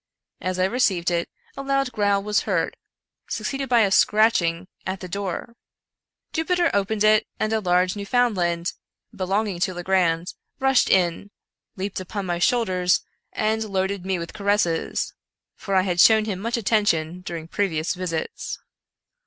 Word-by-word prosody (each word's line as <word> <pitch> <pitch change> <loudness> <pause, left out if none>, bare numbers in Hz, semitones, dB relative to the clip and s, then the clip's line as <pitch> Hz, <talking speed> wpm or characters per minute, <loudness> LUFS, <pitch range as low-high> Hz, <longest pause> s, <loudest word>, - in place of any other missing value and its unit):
As 185 0 -2
I 185 - +3
received 190 -6 +1
it, 170 -1 -1 0.3
a 275 - -5
loud 275 -1 0
growl 205 -3 +1
was 210 0 +2
heard, - - 0 0.5
succeeded 270 +5 -3
by 240 -2 +5
a 200 -3 +2
scratch 215 +2 +4
ing 170 +2 -2 0.2
at 190 0 -4
the 185 - -7
door. 200 +4 -4 0.8
Jupiter 345 +2 +1
opened 205 +1 0
it, 215 0 +4
and 215 +1 0
a 220 - +2
large 180 -1 +2
Newfound 230 +3 +1
land, 175 -1 -1 0.4
belonging 195 0 -1
to 185 0 0
Legrand, 175 -2 +1 0.3
rushed 270 -1 +3
in, 180 +1 +2 0.5
leaped 195 0 -4
upon 195 +2 -5
my 175 -1 -2
shoulders, 185 -5 +2 0.3
and 220 +1 0
loaded 195 -2 -2
me 190 0 -1
with 170 0 -6
caresses; 200 -5 0 0.4
for 195 - -3
I 185 - +4
had 180 -2 -1
shown 220 +2 +6
him 200 -4 -3
much 230 +4 -1
attention 195 -7 +1
during 165 -3 -6
previous 170 -3 -1
visits. 180 -3 -4
195 Hz, 155 wpm, -23 LUFS, 180-215 Hz, 0.8 s, shown